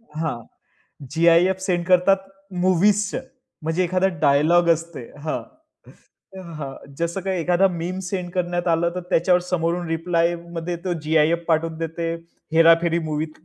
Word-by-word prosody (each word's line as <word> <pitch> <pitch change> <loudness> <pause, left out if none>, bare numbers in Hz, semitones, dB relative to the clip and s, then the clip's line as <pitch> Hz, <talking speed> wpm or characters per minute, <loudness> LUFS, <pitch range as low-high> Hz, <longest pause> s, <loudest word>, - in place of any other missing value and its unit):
हां, 155 -6 -2 0.8
GIF 170 +3 +4
send 180 -2 -1
करतात 185 +1 +4 0.5
मूव्हीजचं, 200 +4 +2 0.4
म्हणजे 165 +4 0
एखादा 185 +2 +1 0.2
डायलॉग 155 +5 +4
असते 165 -2 -1 0.2
हां, 155 - -2 1.1
हां 140 -3 -6 0.3
जसं 170 +3 -2
काही 190 -1 -2
एखादा 180 +3 +3
मीम 175 +1 -4
सेंड 180 -2 -4
करण्यात 175 -1 -1
आलं 170 +1 +2
तर, 180 - -3
त्याच्यावर 180 +1 +3
समोरून 175 -1 -1
रिप्लायमध्ये, 170 +1 -1
तो 180 +1 -4
जी-आय-एफ 160 +2 +2
पाठवून 160 0 0
देते. 165 0 -3 0.4
हेराफेरी 165 +1 +5
मूव्हीत 155 -1 -3
170 Hz, 125 wpm, -22 LUFS, 165-180 Hz, 1.1 s, हेराफेरी